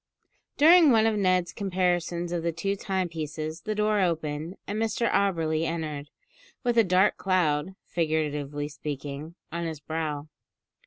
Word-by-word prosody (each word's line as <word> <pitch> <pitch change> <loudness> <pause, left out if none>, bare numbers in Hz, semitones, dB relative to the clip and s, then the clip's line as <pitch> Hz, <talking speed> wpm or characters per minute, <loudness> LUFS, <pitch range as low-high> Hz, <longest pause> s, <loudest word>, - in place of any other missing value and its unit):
During 325 +1 +7
one 225 -3 +5
of 225 -1 +2
Ned's 185 -3 +2
comparisons 175 -3 -1
of 175 -1 -1
the 170 0 0
two 195 +5 -2
timepieces 165 -5 -3
the 215 -1 -3
door 210 0 +2
opened, 160 -1 -1
and 210 +2 -3
Mr 225 +1 0
Auberly 165 -5 +1
entered, 155 -3 -4 0.5
with 240 -2 +1
a - - +7
dark 185 +1 +3
cloud, 185 -2 +1
figuratively 150 -3 -1
speaking, 145 +1 -6 0.2
on 170 +1 -3
his 160 -3 -4
brow. 150 -1 -3
170 Hz, 140 wpm, -27 LUFS, 155-195 Hz, 0.5 s, During